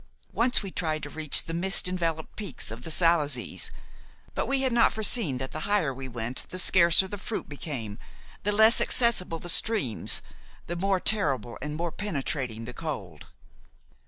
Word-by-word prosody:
Once 245 Hz, -1 st, +2 dB
we 195 Hz, -, -6 dB
tried 155 Hz, -3 st, -3 dB
to -, -, -7 dB
reach 155 Hz, -2 st, +3 dB
the 165 Hz, -, -6 dB
mist 185 Hz, +3 st, +1 dB
enveloped 165 Hz, -3 st, -3 dB
peaks 195 Hz, -, -5 dB
of 115 Hz, +2 st, -8 dB
the -, -, -6 dB
Salazes; 155 Hz, -6 st, +2 dB, 0.6 s
but -, -, -2 dB
we 275 Hz, 0 st, 0 dB
had 260 Hz, -2 st, 0 dB
not 235 Hz, -1 st, +4 dB
foreseen 215 Hz, -, +2 dB
that 130 Hz, +1 st, -5 dB
the 155 Hz, -, -5 dB
higher 185 Hz, -10 st, +1 dB
we 130 Hz, +1 st, -7 dB
went 120 Hz, 0 st, -3 dB
the 185 Hz, -, -6 dB
scarcer 180 Hz, 0 st, +5 dB
the 205 Hz, +1 st, -7 dB
fruit 215 Hz, +2 st, -4 dB
became, 130 Hz, -8 st, -6 dB, 0.4 s
the 205 Hz, -, 0 dB
less 220 Hz, +3 st, +5 dB
accessible 225 Hz, -9 st, +2 dB
the 175 Hz, -, -9 dB
streams, 175 Hz, -, +2 dB, 0.4 s
the 175 Hz, -, -4 dB
more 190 Hz, +2 st, 0 dB
terrible 140 Hz, -, -1 dB
and 150 Hz, 0 st, -4 dB
more 170 Hz, +1 st, -3 dB
penetrating 135 Hz, -, -4 dB
the 125 Hz, -, -8 dB
cold. 100 Hz, -, -7 dB
165 Hz, 170 wpm, -27 LUFS, 135-200 Hz, 0.6 s, scarcer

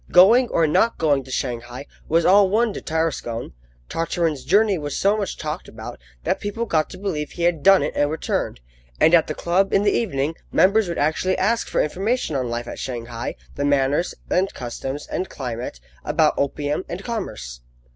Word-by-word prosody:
Going 225 Hz, +8 st, +7 dB
or 165 Hz, -, +2 dB
not 225 Hz, +9 st, +2 dB
going 145 Hz, -4 st, +2 dB
to -, -, -13 dB
Shanghai 120 Hz, +1 st, -4 dB, 0.2 s
was 165 Hz, +1 st, +3 dB
all 195 Hz, +1 st, +6 dB
one 220 Hz, +2 st, +2 dB
to -, -, -6 dB
Tarascon. 155 Hz, -7 st, -2 dB, 0.3 s
Tartarin's 165 Hz, -3 st, -1 dB
journey 205 Hz, -1 st, +3 dB
was 145 Hz, -2 st, -4 dB
so 200 Hz, +2 st, +3 dB
much 205 Hz, -2 st, -3 dB
talked 155 Hz, -1 st, -5 dB
about -, -, -9 dB, 0.2 s
that -, -, 0 dB
people 205 Hz, +3 st, -3 dB
got 155 Hz, -7 st, +1 dB
to -, -, -9 dB
believe 175 Hz, -7 st, -3 dB
he 170 Hz, -, -4 dB
had 170 Hz, -3 st, +2 dB
done 195 Hz, +2 st, +6 dB
it -, -, -2 dB
and 145 Hz, 0 st, +2 dB
returned, 150 Hz, -, -2 dB, 0.4 s
and 160 Hz, -, +5 dB
at 165 Hz, -2 st, +6 dB
the 155 Hz, -, -3 dB
club 185 Hz, +3 st, +1 dB
in 195 Hz, -, +3 dB
the 205 Hz, -, +3 dB
evening 155 Hz, -8 st, 0 dB, 0.2 s
members 200 Hz, +2 st, +4 dB
would 170 Hz, -, -3 dB
actually 160 Hz, +5 st, +1 dB
ask 230 Hz, +4 st, +1 dB
for -, -, +1 dB
information 195 Hz, -, -1 dB
on 130 Hz, -3 st, -1 dB
life 120 Hz, 0 st, -3 dB
at -, -, -7 dB
Shanghai, 120 Hz, -2 st, -5 dB, 0.2 s
the 140 Hz, -, -3 dB
manners 145 Hz, +3 st, +1 dB
and 190 Hz, +2 st, +1 dB
customs 130 Hz, +4 st, -5 dB
and 185 Hz, -, -3 dB
climate, 120 Hz, -, -5 dB, 0.2 s
about -, -, +2 dB
opium, 145 Hz, +3 st, -1 dB
and 180 Hz, +3 st, -5 dB
commerce. 60 Hz, -, -5 dB
160 Hz, 185 wpm, -22 LUFS, 135-195 Hz, 0.4 s, Going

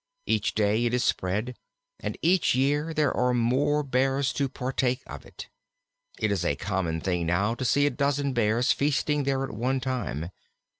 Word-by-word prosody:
Each -, -, 0 dB
day 110 Hz, +2 st, +2 dB
it 120 Hz, +1 st, +1 dB
is 125 Hz, -, +1 dB
spread, 105 Hz, +7 st, -1 dB, 0.4 s
and -, -, -4 dB
each 175 Hz, -5 st, +3 dB
year 145 Hz, +4 st, +1 dB
there 150 Hz, -3 st, +1 dB
are 125 Hz, 0 st, +2 dB
more 135 Hz, +5 st, +2 dB
Bears 135 Hz, +1 st, +1 dB
to 140 Hz, -2 st, -1 dB
partake 130 Hz, 0 st, -1 dB
of -, -, -10 dB
it. -, -, -10 dB, 0.7 s
It 105 Hz, -, 0 dB
is 95 Hz, -4 st, 0 dB
a 85 Hz, -, +1 dB
common 90 Hz, -5 st, -2 dB
thing 90 Hz, -2 st, -1 dB
now 100 Hz, +6 st, +1 dB
to 120 Hz, -, -5 dB
see 145 Hz, +4 st, +3 dB
a 145 Hz, -, +2 dB
dozen 140 Hz, +1 st, 0 dB
Bears 115 Hz, +1 st, +2 dB
feasting 145 Hz, 0 st, +1 dB
there 135 Hz, -1 st, 0 dB
at 135 Hz, -, -4 dB
one 125 Hz, +5 st, -1 dB
time. 120 Hz, -, -3 dB
125 Hz, 180 wpm, -27 LUFS, 105-140 Hz, 0.7 s, each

